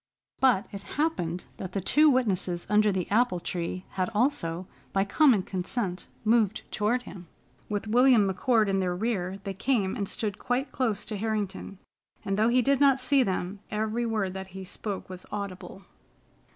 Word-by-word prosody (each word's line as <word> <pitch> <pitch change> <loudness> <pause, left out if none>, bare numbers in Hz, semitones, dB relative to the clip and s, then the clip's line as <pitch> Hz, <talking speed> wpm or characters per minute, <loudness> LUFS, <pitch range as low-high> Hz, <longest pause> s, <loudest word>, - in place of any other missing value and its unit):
But 245 -6 +4
it 200 -2 -7 0.2
happened 180 - -1
that 185 -1 -6
the 195 - 0
two 300 - +4
witnesses 190 -9 +1
under 210 0 +4
the 185 -2 -2
apple 220 -4 +3
tree 175 +1 -4
had 185 -1 -1
also, 185 - 0 0.3
by 195 0 +2
common 220 -1 +4
consent, 185 0 -3 0.2
moved 220 -2 +2
toward 235 +4 0
him. 180 -6 -10 0.4
With 205 0 -2
William 240 -2 +5
McCord 220 +3 +2
in 195 -1 +1
their 180 -1 0
rear, 195 -2 -2
they 195 -1 -4
came 200 -2 0
and 200 -2 -3
stood 210 -3 -2
quite 255 +3 -1
close 225 -6 0
to 215 - -4
Harrington, 205 -2 -3 0.5
and 195 - 0
though 215 +3 +3
he 250 +1 +3
did 275 +1 +2
not 275 -2 +5
see 280 -1 +4
them, 190 -2 -2
every 220 +2 -1
word 210 -5 -1
that 190 0 -6
he 190 - -6
spoke 200 +1 -5
was 185 -1 -8
audible. 195 -1 -6
205 Hz, 170 wpm, -27 LUFS, 190-240 Hz, 0.5 s, William